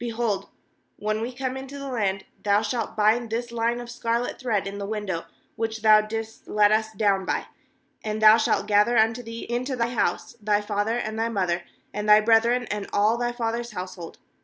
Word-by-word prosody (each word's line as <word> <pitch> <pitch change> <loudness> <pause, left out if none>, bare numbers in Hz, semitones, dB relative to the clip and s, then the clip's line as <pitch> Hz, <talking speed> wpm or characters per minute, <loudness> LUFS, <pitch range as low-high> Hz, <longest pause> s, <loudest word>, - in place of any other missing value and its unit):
18Behold, 230 -4 -2 0.5
when 215 +1 -2
we 235 +2 -3
come 260 0 -4
into 270 +1 -7
the 275 0 -6
land, 200 -7 -1 0.2
thou 205 +1 +2
shalt 225 0 -3
bind 220 +2 +3
this 235 +2 -3
line 235 +1 0
of 240 - -7
scarlet 235 0 -2
thread 225 -6 0
in 200 +1 -5
the 200 - -4
window 205 -5 -3 0.3
which 225 -1 -3
thou 215 -1 +7
didst 220 +1 -6
let 210 0 +4
us 220 0 +1
down 200 -3 +1
by; - - -2 0.6
and 215 0 -3
thou 215 0 +8
shalt 220 -2 +1
gather 210 +3 +3
unto 225 +2 +3
thee 230 -1 -7
into 255 +3 -2
the 235 -1 0
house 175 -7 -1
thy 205 0 +2
father, 210 +2 -1
and 220 -2 -3
thy 230 +1 +1
mother, 185 -5 0 0.3
and 210 0 -3
thy 210 0 +9
brethren, 230 +3 +3
and 205 -1 -4
all 210 +3 +3
thy 240 0 -1
father's 235 -1 -3
house 185 -1 -5
hold. 170 -3 -10
220 Hz, 200 wpm, -25 LUFS, 210-235 Hz, 0.6 s, thy